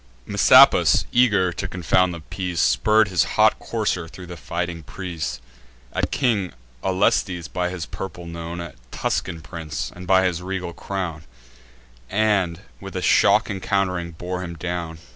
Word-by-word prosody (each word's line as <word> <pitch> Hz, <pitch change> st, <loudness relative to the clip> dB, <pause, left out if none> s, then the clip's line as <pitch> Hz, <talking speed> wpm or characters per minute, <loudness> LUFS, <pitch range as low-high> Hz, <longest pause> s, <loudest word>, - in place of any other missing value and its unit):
Messapus, -, -, +6 dB
eager 105 Hz, -8 st, +3 dB
to -, -, -4 dB
confound 90 Hz, +1 st, +2 dB
the 85 Hz, -2 st, -7 dB
peace, 90 Hz, 0 st, -4 dB
Spurr'd 90 Hz, -, +3 dB
his 85 Hz, -6 st, +3 dB
hot -, -, +5 dB
courser 85 Hz, -2 st, -2 dB
thro' 90 Hz, +2 st, -11 dB
the 90 Hz, 0 st, -8 dB
fighting 85 Hz, 0 st, -4 dB
press, 80 Hz, -8 st, -5 dB, 0.5 s
At -, -, 0 dB
King 110 Hz, -9 st, 0 dB, 0.3 s
Aulestes, 90 Hz, -2 st, +1 dB
by 90 Hz, -1 st, -2 dB
his 90 Hz, -3 st, -5 dB
purple 90 Hz, -2 st, -7 dB
known 85 Hz, +1 st, -6 dB
A 85 Hz, -5 st, -7 dB, 0.2 s
Tuscan 85 Hz, +5 st, -2 dB
prince, 80 Hz, +2 st, -5 dB
and 90 Hz, 0 st, -9 dB
by 95 Hz, 0 st, +5 dB
his 90 Hz, -2 st, -1 dB
regal 90 Hz, -2 st, -4 dB
crown; 85 Hz, -6 st, -5 dB, 0.8 s
And, 100 Hz, -5 st, +1 dB, 0.2 s
with -, -, -9 dB
a -, -, -2 dB
shock -, -, +4 dB
encount'ring, 90 Hz, -3 st, -1 dB
bore 90 Hz, +1 st, -4 dB
him 85 Hz, -1 st, -6 dB
down. 85 Hz, -1 st, -4 dB
90 Hz, 145 wpm, -23 LUFS, 85-95 Hz, 0.8 s, Messapus